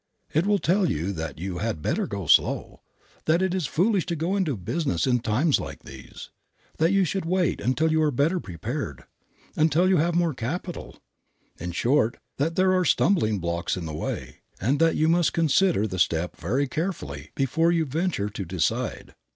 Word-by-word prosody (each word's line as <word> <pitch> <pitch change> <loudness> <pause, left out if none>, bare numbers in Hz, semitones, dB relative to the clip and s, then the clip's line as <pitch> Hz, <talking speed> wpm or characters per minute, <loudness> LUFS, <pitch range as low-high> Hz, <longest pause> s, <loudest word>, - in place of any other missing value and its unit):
It 160 +6 +2
will 205 0 +4
tell 185 0 +2
you 85 +6 -1
that 80 -5 -5
you 90 +2 -4
had 105 -8 -3
better - - 0
go 100 -2 -5
slow, - - +2 0.4
that 170 +4 +3
it 190 -1 0
is 185 -7 -1
foolish 190 - +1
to 170 - -1
go 165 +5 -1
into 165 - 0
business 95 - -1
in 125 -2 +2
times 125 +7 +2
like - - -7
these, - - -11 0.5
that 165 +3 +3
you 195 -1 +3
should 190 +3 -2
wait 180 +1 0
until 155 +6 +1
you 160 0 +2
are 155 - +3
better 150 +7 +1
prepared, 90 - -5 0.5
until 160 +3 +3
you 185 -1 +4
have 170 +2 +1
more 170 -2 +2
capital; 160 +9 -5 0.6
in 90 +2 -4
short, 120 - +1 0.2
that 160 +4 0
there 185 0 +3
are 185 -1 +3
stumbling 165 - +2
blocks 85 0 -2
in 90 - -5
the 80 - -5
way, 75 - -5 0.2
and 130 +9 +1
that 165 0 +3
you 155 - +2
must 170 0 +3
consider 165 - +2
the 95 -4 -4
step 85 +1 +1
very 130 - -1
carefully 120 - -4
before 165 +5 +2
you 165 -2 +1
venture 155 - -1
to 100 -1 -5
decide. 90 -1 -2
150 Hz, 185 wpm, -25 LUFS, -, 0.6 s, will